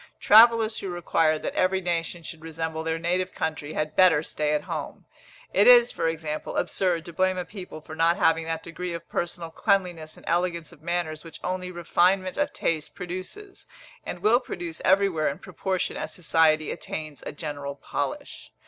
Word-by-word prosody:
Travellers 225 Hz, 0 st, +6 dB
who 195 Hz, -, -5 dB
require 165 Hz, -2 st, +1 dB
that -, -, -4 dB
every 190 Hz, +1 st, +2 dB
nation 170 Hz, -1 st, -2 dB
should 165 Hz, 0 st, -8 dB
resemble 160 Hz, 0 st, -4 dB
their 160 Hz, 0 st, -1 dB
native 180 Hz, +2 st, -1 dB
country, 155 Hz, -1 st, -3 dB
had 155 Hz, 0 st, -2 dB
better 175 Hz, -5 st, +5 dB
stay 150 Hz, -1 st, -1 dB
at 150 Hz, -, -1 dB
home. -, -, -6 dB, 0.5 s
It -, -, +5 dB
is, -, -, +8 dB
for 165 Hz, -, -1 dB
example, 155 Hz, -2 st, -3 dB
absurd 175 Hz, -2 st, 0 dB
to 170 Hz, -, -9 dB
blame 185 Hz, +2 st, +1 dB
a 180 Hz, -, -3 dB
people 180 Hz, -6 st, -9 dB
for 155 Hz, +1 st, -9 dB
not 165 Hz, +1 st, +3 dB
having 165 Hz, 0 st, +3 dB
that 165 Hz, 0 st, -3 dB
degree 175 Hz, +1 st, -5 dB
of 170 Hz, 0 st, -7 dB
personal 170 Hz, -1 st, -4 dB
cleanliness 175 Hz, -5 st, 0 dB
and -, -, -16 dB
elegance 170 Hz, -1 st, 0 dB
of 170 Hz, -, -17 dB
manners 170 Hz, -3 st, -2 dB
which 165 Hz, -, -10 dB
only 185 Hz, 0 st, -3 dB
refinement 180 Hz, +2 st, +1 dB
of 290 Hz, 0 st, 0 dB
taste 160 Hz, -2 st, -2 dB
produces, 185 Hz, -, -7 dB, 0.4 s
and -, -, -6 dB
will 230 Hz, +3 st, +5 dB
produce 175 Hz, -9 st, -6 dB
everywhere 190 Hz, -5 st, +3 dB
in 140 Hz, -, -5 dB
proportion 185 Hz, 0 st, -3 dB
as -, -, -4 dB
society 160 Hz, -2 st, +2 dB
attains 155 Hz, -2 st, -6 dB
a -, -, -3 dB
general 145 Hz, -2 st, -5 dB
polish. -, -, -5 dB
170 Hz, 175 wpm, -26 LUFS, 160-185 Hz, 0.5 s, is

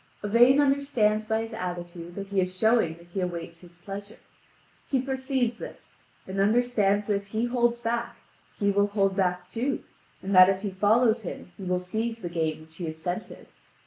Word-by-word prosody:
Yvain 240 Hz, +6 st, +5 dB
understands 270 Hz, -7 st, +2 dB
by 220 Hz, 0 st, 0 dB
his 225 Hz, 0 st, -8 dB
attitude 175 Hz, -3 st, -6 dB
that 200 Hz, -1 st, -6 dB
he 200 Hz, -1 st, +2 dB
is 185 Hz, 0 st, -3 dB
showing 220 Hz, -6 st, +3 dB
that 170 Hz, +1 st, -17 dB
he 190 Hz, +2 st, -3 dB
awaits 170 Hz, -2 st, -4 dB
his 175 Hz, -1 st, -16 dB
pleasure. 200 Hz, +4 st, -8 dB, 0.7 s
He 270 Hz, -, +2 dB
perceives 260 Hz, -2 st, -1 dB
this -, -, -11 dB, 0.3 s
and 190 Hz, +1 st, -4 dB
understands 210 Hz, -1 st, +2 dB
that 210 Hz, -, +1 dB
if 200 Hz, 0 st, -2 dB
he 220 Hz, +3 st, -1 dB
holds 240 Hz, -1 st, +1 dB
back 235 Hz, 0 st, -2 dB, 0.4 s
he 200 Hz, -1 st, +2 dB
will 200 Hz, +1 st, +3 dB
hold 195 Hz, -2 st, +1 dB
back 180 Hz, -2 st, 0 dB
too, 245 Hz, +8 st, -2 dB, 0.4 s
and 195 Hz, +1 st, -2 dB
that 185 Hz, 0 st, +9 dB
if 195 Hz, +1 st, -1 dB
he 200 Hz, -, -2 dB
follows 220 Hz, +4 st, +3 dB
him 180 Hz, -2 st, -7 dB
he 195 Hz, -, -8 dB
will 180 Hz, 0 st, +1 dB
seize 220 Hz, +5 st, -3 dB
the 175 Hz, -, -3 dB
game 160 Hz, -2 st, -2 dB
which 160 Hz, +1 st, -16 dB
he 175 Hz, -, -4 dB
has 160 Hz, 0 st, -5 dB
scented. 175 Hz, +6 st, -5 dB
200 Hz, 190 wpm, -27 LUFS, 180-230 Hz, 0.7 s, that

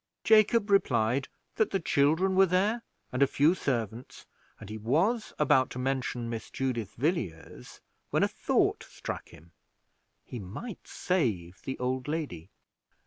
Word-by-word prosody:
Jacob 215 Hz, -1 st, +4 dB
replied 130 Hz, -, +2 dB, 0.3 s
that 220 Hz, -, +3 dB
the 195 Hz, -, 0 dB
children 160 Hz, +5 st, +2 dB
were 195 Hz, 0 st, +6 dB
there, 200 Hz, +6 st, +1 dB, 0.3 s
and 125 Hz, -, -2 dB
a 140 Hz, -, +6 dB
few 150 Hz, +6 st, +3 dB
servants, 120 Hz, -, -3 dB, 0.3 s
and 110 Hz, -, -10 dB
he 105 Hz, -, -6 dB
was 175 Hz, -, +1 dB
about 130 Hz, -3 st, +3 dB
to -, -, -8 dB
mention 125 Hz, -2 st, -2 dB
Miss 115 Hz, -1 st, -5 dB
Judith 120 Hz, -6 st, -3 dB
Villiers, 110 Hz, -, -3 dB, 0.3 s
when -, -, +2 dB
a -, -, +4 dB
thought -, -, +1 dB
struck -, -, -6 dB
him 85 Hz, 0 st, -16 dB, 0.7 s
he 125 Hz, -, -7 dB
might 110 Hz, -, -8 dB
save 100 Hz, -, -1 dB
the 135 Hz, -, -5 dB
old 130 Hz, +1 st, -2 dB
lady. 145 Hz, -, -4 dB
135 Hz, 140 wpm, -29 LUFS, 115-185 Hz, 0.7 s, were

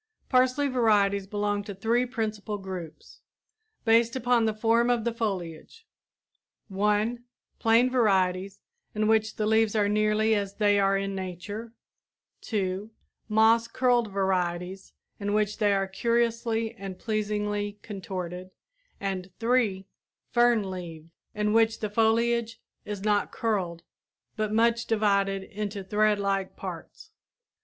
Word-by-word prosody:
Parsley 255 Hz, +2 st, +3 dB
varieties 205 Hz, -6 st, +2 dB
belong 205 Hz, 0 st, -1 dB
to 200 Hz, -, -7 dB
three 230 Hz, +6 st, +1 dB
principal 215 Hz, -3 st, -3 dB
groups, 185 Hz, -5 st, -9 dB, 0.6 s
based 230 Hz, +1 st, +4 dB
upon 245 Hz, -2 st, +2 dB
the 220 Hz, -, +1 dB
form 230 Hz, +2 st, +2 dB
of 240 Hz, -2 st, +1 dB
the 235 Hz, 0 st, -1 dB
foliage: 200 Hz, -, -5 dB, 0.8 s
(1) 210 Hz, +4 st, 0 dB, 0.4 s
Plain 230 Hz, +2 st, +4 dB
varieties, 195 Hz, -5 st, +1 dB, 0.3 s
in 215 Hz, 0 st, +1 dB
which 220 Hz, 0 st, +2 dB
the 215 Hz, -, -1 dB
leaves 220 Hz, 0 st, +2 dB
are 205 Hz, -1 st, +3 dB
nearly 215 Hz, +1 st, +2 dB
as 200 Hz, -2 st, -1 dB
they 205 Hz, -1 st, +3 dB
are 195 Hz, 0 st, +3 dB
in 195 Hz, 0 st, -2 dB
nature; 195 Hz, +5 st, -6 dB, 0.7 s
(2) 195 Hz, -1 st, -2 dB, 0.4 s
moss 225 Hz, +2 st, +4 dB
curled 240 Hz, -3 st, +1 dB
varieties 185 Hz, -1 st, -2 dB, 0.3 s
in 205 Hz, 0 st, -2 dB
which 210 Hz, 0 st, 0 dB
they 210 Hz, -2 st, +3 dB
are 195 Hz, -1 st, +1 dB
curiously 230 Hz, +1 st, 0 dB
and 195 Hz, -4 st, -8 dB
pleasingly 210 Hz, -1 st, -2 dB
contorted; 185 Hz, -3 st, -6 dB, 0.5 s
and 190 Hz, -2 st, -3 dB
(3) 225 Hz, -5 st, +1 dB, 0.5 s
fern 240 Hz, -5 st, +3 dB
leaved, 165 Hz, -3 st, -8 dB, 0.2 s
in 210 Hz, 0 st, 0 dB
which 225 Hz, 0 st, +3 dB
the 215 Hz, -1 st, -3 dB
foliage 230 Hz, +1 st, +1 dB, 0.3 s
is 205 Hz, -2 st, -5 dB
not 210 Hz, -1 st, +1 dB
curled, 185 Hz, -7 st, -2 dB, 0.5 s
but 215 Hz, -1 st, -2 dB
much 230 Hz, +1 st, +2 dB
divided 200 Hz, -3 st, +1 dB
into 205 Hz, -1 st, -5 dB
threadlike 200 Hz, -1 st, +1 dB
parts. -, -, -9 dB
210 Hz, 125 wpm, -27 LUFS, 195-225 Hz, 0.8 s, based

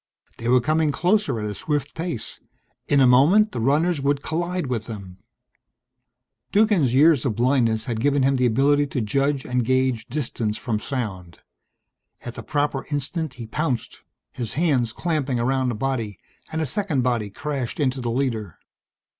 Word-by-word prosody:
They 115 Hz, -, -4 dB
were 125 Hz, +1 st, +5 dB
coming 155 Hz, +4 st, +2 dB
closer 180 Hz, -, +1 dB
at 105 Hz, -, -3 dB
a 105 Hz, -, -3 dB
swift 145 Hz, +6 st, -2 dB
pace. 120 Hz, -10 st, -4 dB, 0.5 s
In 140 Hz, -, +3 dB
a -, -, +7 dB
moment 155 Hz, -, +5 dB
the -, -, -4 dB
runners 150 Hz, +6 st, +2 dB
would 140 Hz, 0 st, 0 dB
collide 175 Hz, +2 st, -2 dB
with 120 Hz, -4 st, -3 dB
them! 95 Hz, -5 st, -8 dB, 1.3 s
Duggan's 200 Hz, -, +3 dB
years 150 Hz, -1 st, +5 dB
of 120 Hz, -6 st, -1 dB
blindness 115 Hz, -3 st, +2 dB
had 115 Hz, -3 st, -3 dB
given 140 Hz, +2 st, +2 dB
him 135 Hz, 0 st, +3 dB
the 125 Hz, -1 st, +3 dB
ability 145 Hz, +5 st, +3 dB
to 130 Hz, -, -2 dB
judge 135 Hz, +5 st, 0 dB
and 125 Hz, 0 st, 0 dB
gauge 130 Hz, -1 st, +1 dB
distance 120 Hz, -5 st, -2 dB
from 110 Hz, -3 st, -2 dB
sound. 95 Hz, -9 st, -5 dB, 0.8 s
At 120 Hz, -, -7 dB
the -, -, -7 dB
proper 145 Hz, -2 st, -1 dB
instant 150 Hz, 0 st, -2 dB
he 120 Hz, -, -7 dB
pounced, 130 Hz, +1 st, -3 dB, 0.3 s
his 120 Hz, -4 st, -5 dB
hands 140 Hz, -8 st, +1 dB
clamping 140 Hz, -4 st, -1 dB
around 130 Hz, +1 st, +1 dB
a -, -, -3 dB
body, 115 Hz, -5 st, -2 dB, 0.3 s
and 160 Hz, 0 st, -1 dB
a -, -, 0 dB
second 155 Hz, -3 st, -1 dB
body 120 Hz, -4 st, 0 dB
crashed 140 Hz, +3 st, -4 dB
into 130 Hz, -2 st, 0 dB
the 120 Hz, -, -2 dB
leader. 115 Hz, -, -2 dB
130 Hz, 165 wpm, -23 LUFS, 115-150 Hz, 1.3 s, a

